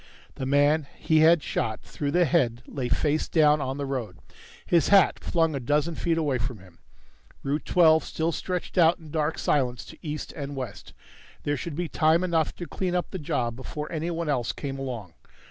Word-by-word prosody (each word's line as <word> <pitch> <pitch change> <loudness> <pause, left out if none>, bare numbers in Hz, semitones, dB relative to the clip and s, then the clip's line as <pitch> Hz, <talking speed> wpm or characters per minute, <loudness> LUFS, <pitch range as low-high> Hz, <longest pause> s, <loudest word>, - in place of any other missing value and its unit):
The 130 - -5
man 145 +2 +3
he 160 -1 +2
had 160 0 +5
shot 110 -1 -2
through 145 - -4
the 175 +4 +3
head 130 -6 +1
lay 130 -3 -4
face 150 +4 +1
down 150 -2 +4
on 135 0 -3
the 140 - -3
road, 125 -9 -4 0.5
his 170 -2 +3
hat 200 -1 +5
flung 165 -2 +1
a 140 - -2
dozen 150 +6 0
feet 165 +1 0
away 145 -6 0
from 125 -1 -3
him. 90 -4 -18 0.6
Route 145 +3 -2
Twelve 160 -3 +5
still 165 +1 -1
stretched 180 +2 -3
out 165 +1 +5
in 160 -3 -13
dark 155 0 -1
silence 125 -4 0
to - - -13
east 150 -2 -5
and 145 -2 -5
west. 125 -7 -7 0.5
There 145 - 0
should 145 +3 -5
be 175 +2 -2
time 160 +3 +3
enough 165 -4 0
to 175 - -6
clean 180 +1 -2
up 180 - -1
the 190 - -4
job 120 -6 -1
before 150 +5 -6
anyone 165 0 -2
else 125 -6 0
came 135 -2 -5
along. 120 -10 -5
150 Hz, 195 wpm, -26 LUFS, 135-165 Hz, 0.6 s, had